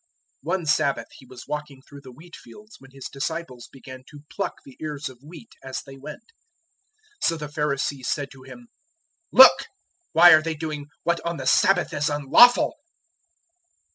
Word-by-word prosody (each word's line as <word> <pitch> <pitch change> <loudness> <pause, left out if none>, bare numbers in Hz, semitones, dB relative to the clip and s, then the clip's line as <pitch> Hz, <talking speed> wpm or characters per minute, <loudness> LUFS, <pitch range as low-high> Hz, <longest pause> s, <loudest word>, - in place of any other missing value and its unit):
002:023 - - -8
One 180 -3 -5
Sabbath 140 -2 0
He - - -16
was 125 -1 -13
walking 150 -2 -6
through 140 0 -14
the 130 -2 -13
wheatfields 175 - -15
when 135 - -17
His 135 0 -12
disciples 135 -3 -6
began 130 -1 -12
to 145 -1 -14
pluck - - -4
the 135 - -15
ears 150 -2 -5
of 130 -1 -17
wheat 165 +9 -14
as 130 -1 -6
they 135 -1 -13
went. 145 +3 -11 1.0
002:024 - - +2
So 165 - 0
the 150 -1 -7
Pharisees 140 -3 -3
said 140 -1 -3
to 135 - -15
Him, 235 - -14 0.6
"Look! - - +7 0.5
why 175 +2 +8
are 155 -1 +7
they 160 0 -4
doing 150 -2 -6 0.2
what 170 0 -1
on 170 0 -4
the 135 - -7
Sabbath 180 +2 +2
is 145 +1 -1
unlawful?" 150 - +4
150 Hz, 170 wpm, -23 LUFS, 135-165 Hz, 1.0 s, why